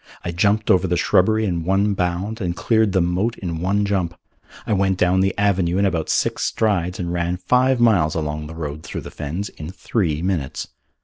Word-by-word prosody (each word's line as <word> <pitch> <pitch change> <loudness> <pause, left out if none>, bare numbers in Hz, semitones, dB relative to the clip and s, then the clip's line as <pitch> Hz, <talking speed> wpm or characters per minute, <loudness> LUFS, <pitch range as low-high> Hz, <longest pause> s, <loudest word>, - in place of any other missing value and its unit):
I 85 - -2
jumped 100 +5 +2
over 95 0 +3
the 90 0 0
shrubbery 110 +5 +3
in 85 -4 -1
one 100 +4 +2
bound 95 +5 -2
and 85 -2 -2
cleared 110 -1 +2
the 95 -1 +2
moat 90 +7 0
in 85 -4 -4
one 100 +3 +1
jump. 95 -4 -1 0.5
I 110 - 0
went 95 -1 +1
down 90 +1 +3
the 95 +1 +1
avenue 95 -3 +1
in 100 - +3
about 85 -5 -1
six - - 0
strides 95 -5 0
and 85 -1 -3
ran 85 +1 -1
five 125 +7 +2
miles 100 -10 +3
along 75 -1 -3
the 80 - -9
road 75 -2 -5
through - - -6
the - - -9
fens 85 +8 -4
in 75 +1 -9
three 85 -5 -2
minutes. 85 -8 -2
90 Hz, 200 wpm, -21 LUFS, 85-100 Hz, 0.5 s, over